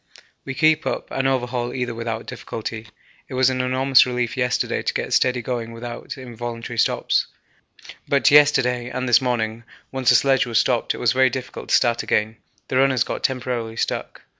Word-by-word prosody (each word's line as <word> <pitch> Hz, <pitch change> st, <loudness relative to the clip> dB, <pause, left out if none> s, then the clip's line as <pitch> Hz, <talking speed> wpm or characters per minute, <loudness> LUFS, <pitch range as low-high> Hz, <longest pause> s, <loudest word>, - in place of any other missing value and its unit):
We 130 Hz, -, -5 dB
keep 155 Hz, +2 st, +3 dB
up -, -, -3 dB
and 135 Hz, 0 st, 0 dB
overhaul 125 Hz, -2 st, -1 dB
either 125 Hz, -2 st, -2 dB
without 115 Hz, 0 st, -4 dB
difficulty. 115 Hz, -2 st, -6 dB, 0.4 s
It 130 Hz, -, -7 dB
was 130 Hz, 0 st, +3 dB
an 130 Hz, 0 st, -1 dB
enormous 130 Hz, +1 st, +4 dB
relief 125 Hz, -2 st, -2 dB
yesterday 125 Hz, -1 st, 0 dB
to -, -, -2 dB
get -, -, -2 dB
steady 125 Hz, -1 st, +2 dB
going 115 Hz, -1 st, -4 dB
without 120 Hz, +3 st, -7 dB
involuntary 120 Hz, -2 st, -6 dB
stops, -, -, +1 dB, 0.8 s
but 140 Hz, 0 st, +3 dB
yesterday 125 Hz, -4 st, +4 dB
and 130 Hz, 0 st, -3 dB
this 120 Hz, 0 st, +5 dB
morning, 115 Hz, -3 st, -2 dB, 0.3 s
once 130 Hz, -2 st, 0 dB
the 125 Hz, -, +6 dB
sledge 135 Hz, +1 st, +3 dB
was 115 Hz, -2 st, 0 dB
stopped, 120 Hz, 0 st, +1 dB
it -, -, -8 dB
was 120 Hz, -, +2 dB
very 130 Hz, 0 st, +4 dB
difficult 130 Hz, 0 st, -7 dB
to -, -, +4 dB
start 120 Hz, -1 st, +2 dB
again 110 Hz, +1 st, 0 dB, 0.3 s
the 130 Hz, -, -1 dB
runners 130 Hz, -2 st, +3 dB
got -, -, -5 dB
temporarily 125 Hz, -4 st, -2 dB
stuck. -, -, -3 dB
125 Hz, 180 wpm, -22 LUFS, 120-130 Hz, 0.8 s, the